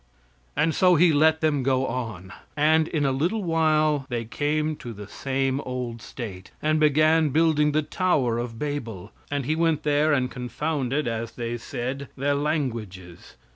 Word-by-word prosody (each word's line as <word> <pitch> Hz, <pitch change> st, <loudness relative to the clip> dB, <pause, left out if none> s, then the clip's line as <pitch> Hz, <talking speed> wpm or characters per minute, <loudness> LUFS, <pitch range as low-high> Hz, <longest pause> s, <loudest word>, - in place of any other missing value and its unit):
And 155 Hz, +3 st, +2 dB
so 180 Hz, +3 st, +4 dB
He 170 Hz, 0 st, +5 dB
let 160 Hz, +2 st, +4 dB
them 155 Hz, -3 st, +2 dB
go 130 Hz, 0 st, +1 dB
on, 115 Hz, -7 st, -5 dB, 0.2 s
and 155 Hz, +2 st, +4 dB
in 150 Hz, -4 st, -1 dB
a 135 Hz, -, +2 dB
little 175 Hz, +11 st, 0 dB
while 155 Hz, -4 st, +2 dB
they 120 Hz, -2 st, -2 dB
came 150 Hz, +5 st, -1 dB
to 120 Hz, -2 st, -8 dB
the 105 Hz, -1 st, -9 dB
same 135 Hz, +3 st, -1 dB
old 125 Hz, -3 st, -5 dB
state; 95 Hz, -8 st, -8 dB
and 155 Hz, 0 st, +1 dB
began 155 Hz, +1 st, +4 dB
building 150 Hz, 0 st, +3 dB
the 155 Hz, +1 st, +1 dB
Tower 140 Hz, -10 st, +1 dB
of 120 Hz, -1 st, -5 dB
Babel; 115 Hz, -9 st, -5 dB, 0.2 s
and 145 Hz, -2 st, -2 dB
he 155 Hz, +4 st, 0 dB
went 165 Hz, -2 st, +1 dB
there 150 Hz, +1 st, +2 dB
and 130 Hz, -3 st, +1 dB
confounded, 135 Hz, +2 st, -2 dB
as 115 Hz, 0 st, -3 dB
they 120 Hz, -1 st, -4 dB
said, 130 Hz, +4 st, -5 dB
their 140 Hz, +2 st, +1 dB
languages. 115 Hz, -, -3 dB
145 Hz, 165 wpm, -25 LUFS, 120-155 Hz, 0.2 s, He